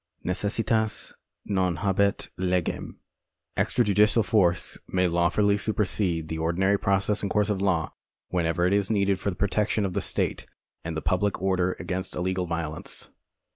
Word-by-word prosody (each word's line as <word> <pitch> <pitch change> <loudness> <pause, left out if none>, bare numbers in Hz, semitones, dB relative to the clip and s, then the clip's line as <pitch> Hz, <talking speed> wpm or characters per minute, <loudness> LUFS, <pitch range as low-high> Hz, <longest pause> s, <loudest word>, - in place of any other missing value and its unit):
Necessitas 110 +4 0 0.3
non 95 -3 +1
habet 100 +2 +1
legem. 90 -1 -1 0.6
Extrajudicial 105 0 +3
force 90 -5 +1
may 90 0 +1
law 85 0 +2
fully 100 +2 +2
su[)ersede 95 -6 0
the 80 0 -4
ordinary 95 +5 +1
process 100 +2 +2
and 100 - -2
course 105 +1 +1
of 95 -2 -1
law, 90 -6 0 0.4
whenever 85 -1 +1
it 90 - +2
is 100 -1 +1
needed 100 -3 +2
for 100 - -1
the 90 - -4
protection 100 +2 0
of 95 - -3
the - - -1
state - - -1 0.4
and 80 -1 -4
the - - -4
public 100 +2 +1
order 95 -1 +1
against 95 -1 -4
illegal 90 0 -1
violence. 80 -2 -4
95 Hz, 150 wpm, -26 LUFS, 90-100 Hz, 0.6 s, Extrajudicial